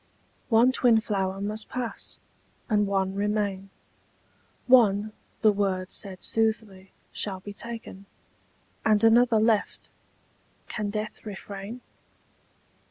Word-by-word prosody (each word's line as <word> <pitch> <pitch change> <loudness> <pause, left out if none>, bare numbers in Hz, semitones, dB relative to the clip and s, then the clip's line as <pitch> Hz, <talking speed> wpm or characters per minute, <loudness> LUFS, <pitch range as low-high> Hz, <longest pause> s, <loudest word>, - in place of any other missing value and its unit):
One 235 +2 +5
twin 245 -3 +4
flower 195 -3 -2
must 210 +2 -3
pass, 250 -3 -5 0.5
and 210 -2 +2
one 195 -1 0
remain: 200 -1 -1 1.0
One, 215 -4 +4 0.3
the 215 - +6
word 195 -2 -1
said 190 -2 -3
soothly, 220 -4 -1 0.2
shall 195 -2 -3
be 205 +2 -9
taken, 225 -3 -7 0.8
And 215 0 +3
another 225 0 +5
left: 220 -1 0 0.8
can 210 -2 -3
death 215 +1 -5
refrain? 205 +2 -7
210 Hz, 100 wpm, -26 LUFS, 195-225 Hz, 1.0 s, the